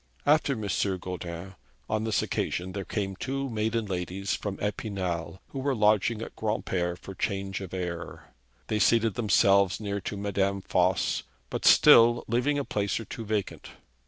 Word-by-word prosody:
After 145 -1 +4
M. 110 -5 -4 0.3
Goudin, 90 0 -6 0.3
on 110 0 -1
this 110 -2 +1
occasion, 90 +2 -2
there 100 +1 -4
came 95 -1 -3
two 135 +4 -3
maiden 110 +1 -1
ladies 95 +1 -3
from 95 +1 -3
Epinal 95 -4 -3
who 135 - -6
were 135 0 0
lodging 110 +1 +2
at - - -9
Granpere 95 -5 -1
for 95 - -9
change 95 0 -3
of 95 -2 -7
air. 90 -2 -6 0.3
They 110 - -1
seated 115 +2 +3
themselves 100 -3 +3
near 100 -2 -3
to 100 - -5
Madame 100 -1 0
Voss, 90 0 +1 0.3
but - - -3
still 120 +1 +7
leaving 125 +6 +1
a 140 - -1
place 100 0 -1
or 115 - -7
two 115 +3 -7
vacant. 105 -2 -3
100 Hz, 160 wpm, -28 LUFS, 95-110 Hz, 0.3 s, still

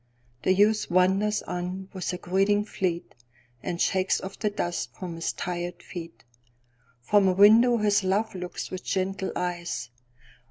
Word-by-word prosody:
The 185 - +3
youth 210 +2 +3
wanders 190 +4 +2
on 180 +2 -4
with 185 -2 -3
a 180 - -4
greeting 195 +4 +1
fleet, 180 -5 -3 0.5
And 170 +6 -4
shakes 190 0 +2
off 190 +1 -8
the 210 - +1
dust 175 -4 -3
from 180 -3 -6
his 165 0 -2
tired 175 0 -5
feet. 165 -9 -9 0.8
From 200 - +4
a 185 - +3
window 225 +5 +6
his 205 -2 +2
love 195 +4 0
looks 180 -1 -6
with 185 - -5
gentle 190 0 -1
eyes. 175 -7 -3
185 Hz, 150 wpm, -26 LUFS, 180-205 Hz, 0.8 s, window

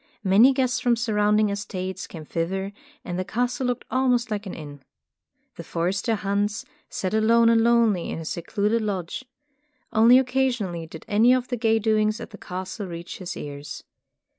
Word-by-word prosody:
Many 210 +7 +6
guests 255 -2 0
from 245 -1 +2
surrounding 210 -2 +2
es 200 0 -3
tates 185 -3 -5
came 160 -3 -9
thither 190 +5 -3 0.3
and 175 0 -3
the - - 0
castle 245 +5 -1
looked 245 0 -2
almost 250 -2 +1
like 210 -1 -3
an - - -6
inn. 145 -2 -9 0.8
The - - -7
forester, 195 +7 -1
Hans, 205 0 -1 0.2
sat 185 0 -3
alone 230 +1 +4
and 230 -1 +4
lonely 230 -6 +3
in - - -4
his 165 -1 -5
secluded 210 +6 -1
lodge. 195 0 -3 0.7
Only 230 +3 +7
occasionally 250 -10 0
did 160 0 -11
any 225 +4 +5
of 250 -1 -2
the 250 - -1
gay 225 -1 +2
doings 215 0 +1
at 235 - -8
the 205 - -11
castle 190 +3 -6
reach 170 0 -7
his 185 -2 -6
ears. 145 0 -7
210 Hz, 170 wpm, -24 LUFS, 185-235 Hz, 0.8 s, Only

